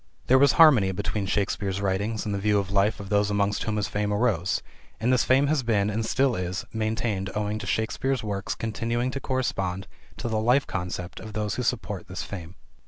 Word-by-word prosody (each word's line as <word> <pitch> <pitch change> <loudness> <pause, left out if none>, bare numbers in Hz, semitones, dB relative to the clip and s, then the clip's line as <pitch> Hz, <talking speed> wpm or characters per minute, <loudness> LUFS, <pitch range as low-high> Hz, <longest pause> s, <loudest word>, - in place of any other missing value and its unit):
There 130 +1 +5
was 140 0 +5
harmony 130 -13 +6
between 100 +1 -2
Shakespeare's 100 0 -1
writings 100 +3 -1
and 105 - -2
the 100 - -1
view 105 +1 +2
of 100 -1 -1
life 100 +2 +2
of 100 -1 -8
those 105 0 +2
amongst 100 0 0
whom 110 -1 -1
his 105 0 0
fame 105 0 -1
arose. 105 -5 +1 0.4
And 125 +3 +2
this 125 - +3
fame 135 +2 +4
has 150 -1 +1
been, 105 -4 +1
and 110 +2 -1
still 130 +2 +2
is, 90 +2 -3
maintained 110 -3 -1
owing 105 0 -1
to 100 - -6
Shakespeare's 120 +4 -1
works 100 -2 -3
continuing 115 +2 -2
to 135 - -4
correspond 95 -9 -2 0.3
to - - -4
the 110 -1 0
life 125 +5 +3
concept 90 -1 -4
of 110 - -9
those 105 0 -2
who - - -2
support 110 -5 -2
this 90 -2 -5
fame. 90 -2 -8
105 Hz, 205 wpm, -26 LUFS, 100-115 Hz, 0.4 s, harmony